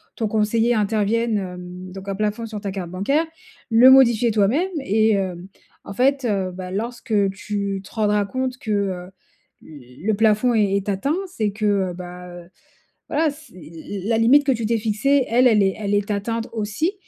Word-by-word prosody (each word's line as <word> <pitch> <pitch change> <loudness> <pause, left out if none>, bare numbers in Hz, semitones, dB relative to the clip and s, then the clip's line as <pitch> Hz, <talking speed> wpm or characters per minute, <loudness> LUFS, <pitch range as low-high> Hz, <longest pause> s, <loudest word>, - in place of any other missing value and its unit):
ton 225 - -1
conseiller 225 +3 +1
intervienne. 215 +1 +1
Hem 180 -1 -7
donc 195 +1 -8
un 195 - -2
plafond 215 +3 -2
sur 215 -1 -6
ta 200 -2 -4
carte 185 -3 -5
bancaire. 275 - 0 0.5
Le 240 +3 +7
modifier 240 -3 +5
toi-même 225 - +2
et 220 -2 +2
hem 185 -2 -3 0.4
en 200 - -8
fait, 270 +3 +1
heu, 195 -4 -1
bah, 180 0 -7
lorsque 230 +3 -4 0.2
tu 200 0 -4
te - - -15
rendras 210 -2 +1
compte 255 +3 -3
que 215 - -5
heu 190 -3 -2 0.5
le 145 - -5
plafond 220 +3 +2
est 205 -2 +2
est 200 +1 -4
atteint, 205 +11 0
c'est 220 - -2
que, 215 +1 -4 0.3
heu, - - -7
bah, 180 0 -9
heu, 175 0 -11 0.6
voilà, 305 0 +1
c'est 300 - -16
l 170 +4 -9
la - - -3
la 225 - +3
limite 275 +5 +5
que 275 - +3
tu 230 -1 -3
t'es 230 +1 +1
fixée, 245 +6 +1
elle 250 +2 +4
elle 215 -3 +4
est 195 0 +1
elle 205 -1 -2
est 205 +1 -1
atteinte 225 +3 -2
aussi. 220 - -1
210 Hz, 190 wpm, -21 LUFS, 195-235 Hz, 0.6 s, Le